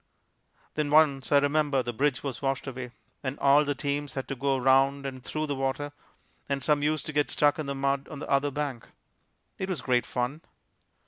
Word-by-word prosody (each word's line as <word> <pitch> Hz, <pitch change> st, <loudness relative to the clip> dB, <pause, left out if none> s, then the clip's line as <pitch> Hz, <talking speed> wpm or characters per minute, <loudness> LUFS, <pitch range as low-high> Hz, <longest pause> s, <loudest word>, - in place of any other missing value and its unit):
Then 150 Hz, -1 st, -1 dB
once, 145 Hz, -3 st, +4 dB
I 145 Hz, -, +7 dB
remember, 145 Hz, -1 st, +2 dB
the 120 Hz, -, -4 dB
bridge 140 Hz, +3 st, 0 dB
was 130 Hz, -4 st, -4 dB
washed 135 Hz, -1 st, -1 dB
away, 130 Hz, -2 st, -5 dB, 0.3 s
and 135 Hz, 0 st, -3 dB
all 140 Hz, +2 st, +5 dB
the 145 Hz, -1 st, -1 dB
teams 145 Hz, -1 st, -3 dB
had 135 Hz, -, -3 dB
to 135 Hz, -, -2 dB
go 135 Hz, +1 st, +1 dB
around 135 Hz, +2 st, +3 dB
and 130 Hz, -2 st, -6 dB
through 155 Hz, +3 st, -2 dB
the 145 Hz, -, -2 dB
water, 135 Hz, +2 st, -2 dB, 0.6 s
and 140 Hz, -1 st, -1 dB
some 150 Hz, 0 st, +3 dB
used 155 Hz, 0 st, 0 dB
to 155 Hz, -, -5 dB
get 145 Hz, 0 st, +1 dB
stuck 145 Hz, +1 st, +2 dB
in 150 Hz, -, -3 dB
the 140 Hz, -, -2 dB
mud 135 Hz, 0 st, 0 dB
on 155 Hz, -, -8 dB
the -, -, -6 dB
other 140 Hz, +1 st, +2 dB
bank. 140 Hz, -4 st, -4 dB, 0.7 s
It 190 Hz, -, -3 dB
was 185 Hz, -, -2 dB
great 125 Hz, -2 st, +1 dB
fun! 125 Hz, +5 st, -2 dB
140 Hz, 205 wpm, -28 LUFS, 135-145 Hz, 0.7 s, I